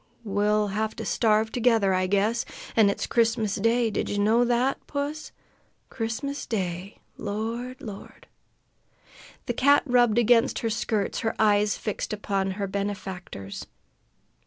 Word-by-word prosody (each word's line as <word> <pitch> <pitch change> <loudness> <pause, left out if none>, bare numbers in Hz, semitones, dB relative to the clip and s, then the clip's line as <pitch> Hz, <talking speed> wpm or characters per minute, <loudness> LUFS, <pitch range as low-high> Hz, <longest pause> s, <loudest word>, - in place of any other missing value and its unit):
We'll 210 0 +1
have 215 +2 -2
to 225 - -6
starve 220 +1 +2
together, 225 -5 +3
I 185 0 +1
guess. 205 +4 +1 0.3
An' 215 -3 +5
it's 200 - -2
Christmas 225 -3 +1
day! 230 +2 +2
Did - - -2
ye 205 - -2
know 220 +4 +4
that, 245 +2 0
puss? 290 +2 -4 0.6
Christmas 250 +5 -4
day! 185 -2 -3 0.2
Lord! 230 +5 -4
Lord!" 205 -4 -10 1.2
The 240 - -1
cat 280 +4 +4
rubbed 245 -4 +3
against 240 +1 +4
her 225 - +1
skirts, 215 -2 -1
her 225 - -1
eyes 210 -1 +3
fixed 215 0 -4
upon 200 -2 -1
her 200 - -1
benefactor's. 190 - -5
220 Hz, 135 wpm, -26 LUFS, 200-235 Hz, 1.2 s, An